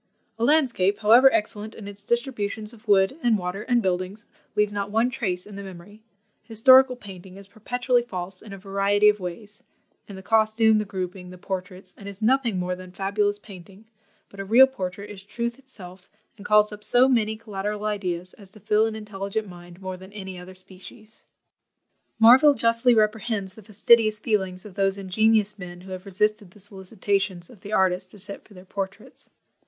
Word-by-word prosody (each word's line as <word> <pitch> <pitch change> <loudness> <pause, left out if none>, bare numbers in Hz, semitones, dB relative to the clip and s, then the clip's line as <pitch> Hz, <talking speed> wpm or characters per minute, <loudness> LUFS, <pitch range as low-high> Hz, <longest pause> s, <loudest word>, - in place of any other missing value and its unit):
"A - - -1
landscape, 235 -9 +2
however 240 +5 +7
excellent 215 0 -2
in 205 - -10
its 200 0 -10
distributions 220 -2 -3
of 230 0 -18
wood, 200 +7 +3
and 235 -4 +3
water, 180 +1 -4
and 240 0 +1
buildings, 185 +4 -2 0.3
leaves 210 0 +1
not 200 0 -3
one 225 +4 +1
trace 185 -8 -3
in 205 -1 -11
the - - -6
memory; 195 +2 -12 0.4
historical 255 +3 +5
painting 190 -4 -12
is 200 -1 -13
perpetually 245 +4 -1
false 185 -5 -6
in 215 - -12
a 195 - -7
variety 200 +2 +2
of 210 0 0
ways, 200 +4 -8 0.4
in 200 - -9
the 190 - -10
costume, 220 0 +3
the 210 - -2
grouping, 185 -1 -6
the 180 - -11
portraits, 185 0 -7
and 200 - -8
is 200 -1 -11
nothing 235 -2 +1
more 180 0 -2
than 185 0 -12
fabulous 205 +2 -1
painting; 195 0 -14 0.4
but 200 - -15
a - - -3
real 230 +7 +7
portrait 200 -6 -6
is 205 -2 -10
truth 235 +5 -5
itself, 190 -8 -12 0.3
and 205 -2 -10
calls 210 0 +4
up 210 0 -9
so 245 +4 +4
many 220 -4 +1
collateral 210 -1 -5
ideas 185 -4 -3
as 200 -3 -16
to 215 - -17
fill 210 +2 +2
an 220 - -5
intelligent 210 0 -5
mind 175 -1 -13
more 185 0 -5
than 190 +2 -13
any 190 -3 -7
other 180 +1 -11
species." 190 +4 -12 0.9
Marville 260 +6 +7
justly 230 +1 +3
reprehends 215 -2 0
the 220 - -14
fastidious 215 +1 +3
feelings 190 -4 -2
of 205 - -11
those 195 0 0
ingenious 210 +2 +1
men 175 -1 -9
who 190 +1 -12
have 185 +1 -7
resisted 210 +1 -1
the 210 - -19
solicitations 195 -2 -3
of 215 -6 -17
the 205 - -9
artist, 185 -2 +1
to 205 - -15
sit 200 +1 -7
for 205 - -19
their 180 0 -13
portraits. 195 0 -7
205 Hz, 185 wpm, -24 LUFS, 190-220 Hz, 0.9 s, however